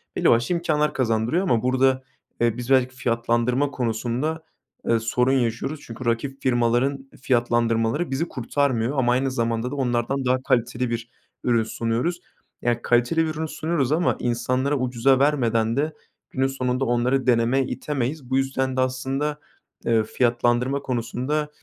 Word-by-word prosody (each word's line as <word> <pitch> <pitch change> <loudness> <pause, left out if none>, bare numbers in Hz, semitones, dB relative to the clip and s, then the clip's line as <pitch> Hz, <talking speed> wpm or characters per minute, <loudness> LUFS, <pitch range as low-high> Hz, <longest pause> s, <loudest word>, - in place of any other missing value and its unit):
belli - - +3
başlı 120 +10 +3
imkânlar 150 -3 +1
kazandırıyor 120 - +1
ama 120 - +1
burada, 130 +1 +2 0.4
eee, 115 0 +2
biz 125 +1 -6
belki 130 -1 +3
fiyatlandırma 120 +3 0
konusunda, 125 +7 -2 0.5
eee, 115 - +4
sorun 125 +3 +1
yaşıyoruz. 130 +3 -1
Çünkü 120 0 -9
rakip 135 +4 -1
firmaların 130 +2 +1
fiyatlandırmaları 120 +2 +1
bizi 150 +6 -1
kurtarmıyor 130 -1 -1
ama 120 -2 +3
aynı 130 +2 +1
zamanda 115 0 -1
da - - -4
onlardan 130 0 -1
daha 130 +1 +1
kaliteli 125 0 0
bir 115 0 -4 0.3
ürün 115 -2 +2
sunuyoruz. 115 +10 -2 0.4
Ya, 120 -1 0
kaliteli 120 +7 +2
bir 160 - -2
ürün 160 +1 -2
sunuyoruz 155 -3 -1
ama 165 +3 +2
insanlara 130 +4 0
ucuza 130 +1 +2
vermeden 115 -5 +2
de 155 +2 0 0.4
günün 135 0 0
sonunda 130 0 -1
onları 125 +2 +1
denemeye 125 +2 +3
itemeyiz. 140 -1 -3
Bu 130 - +2
yüzden 135 -1 -1
de - - +3
aslında, 135 +3 -1 0.5
eee, 115 -1 +3
fiyatlandırma 120 +3 +1
konusunda 130 +4 -2
130 Hz, 145 wpm, -23 LUFS, 120-135 Hz, 0.5 s, eee